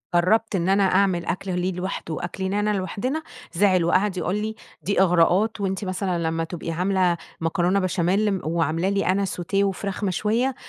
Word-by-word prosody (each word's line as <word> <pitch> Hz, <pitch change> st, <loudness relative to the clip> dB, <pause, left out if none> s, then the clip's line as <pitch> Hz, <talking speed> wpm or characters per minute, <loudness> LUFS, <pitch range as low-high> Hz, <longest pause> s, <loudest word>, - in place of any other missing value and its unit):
جربت 215 Hz, +5 st, +2 dB
إن 175 Hz, 0 st, 0 dB
أنا 195 Hz, +1 st, +4 dB
أعمل 185 Hz, -2 st, +2 dB
أكل 185 Hz, 0 st, -2 dB
ليه 185 Hz, +1 st, 0 dB
لواحده، 180 Hz, -2 st, -4 dB
وأكل 175 Hz, +4 st, -5 dB
لينا 210 Hz, +1 st, +1 dB
لوحدنا، 250 Hz, +11 st, -3 dB, 0.3 s
زعل 185 Hz, -1 st, +3 dB
وقعد 185 Hz, +3 st, +2 dB
يقول 180 Hz, +1 st, -1 dB
لي 215 Hz, +1 st, -3 dB, 0.3 s
دي 200 Hz, -1 st, +2 dB
إغراءات 185 Hz, +4 st, +3 dB
وأنتِ 190 Hz, 0 st, -2 dB
مثلًا 185 Hz, -1 st, -1 dB
لما 165 Hz, 0 st, -1 dB
تبقي 165 Hz, 0 st, -5 dB
عاملة 180 Hz, 0 st, +1 dB, 0.2 s
مكرونة 175 Hz, +4 st, +1 dB
بشاميل، 190 Hz, +2 st, +1 dB
وعاملة 165 Hz, +2 st, 0 dB
لي 200 Hz, 0 st, 0 dB
أنا 195 Hz, +2 st, +2 dB
Sauté 180 Hz, 0 st, -5 dB
وفراخ 195 Hz, +1 st, -3 dB
مشوية 220 Hz, +7 st, 0 dB
190 Hz, 165 wpm, -24 LUFS, 175-200 Hz, 0.3 s, أنا